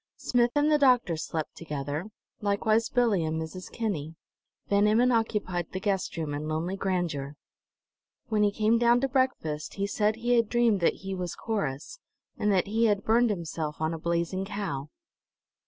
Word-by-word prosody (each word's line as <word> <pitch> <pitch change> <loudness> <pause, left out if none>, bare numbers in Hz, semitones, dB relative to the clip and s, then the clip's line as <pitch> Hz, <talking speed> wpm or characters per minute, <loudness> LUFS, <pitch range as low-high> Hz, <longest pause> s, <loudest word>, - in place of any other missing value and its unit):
Smith 240 -1 +2
and 295 +1 +3
the 300 - +4
doctor 250 - +4
slept 160 0 -4
together, 150 +2 -4 0.3
likewise 215 +2 +1
Billie 230 -8 +2
and 160 0 -1
Mrs. 160 +3 -7
Kinney; 165 -9 -3 0.5
Van 205 +1 +3
Emmon 235 +4 +4
occupied 210 -7 0
the 185 - -3
guest 195 -3 -1
room 155 -3 -2
in 150 +1 -4
lonely 160 +4 -2
grandeur. 175 -8 -2 0.9
When 215 -1 +1
he 205 - +5
came 220 +2 +2
down 240 0 +4
to 270 - +2
breakfast 250 - -1
he 200 - -1
said 210 +1 +1
he 240 +2 +1
had 230 -2 +2
dreamed 235 -4 +3
that 170 - +1
he 195 - -3
was 180 -2 -4
Corrus, 200 - -3 0.4
and 210 - +1
that 190 -2 +3
he 225 +3 +1
had 205 -2 +2
burned 235 +2 +3
himself 160 -5 -3
on 160 +1 0
a 165 - -5
blazing 170 +3 -1
cow. 195 -9 -4
200 Hz, 170 wpm, -28 LUFS, 160-225 Hz, 0.9 s, he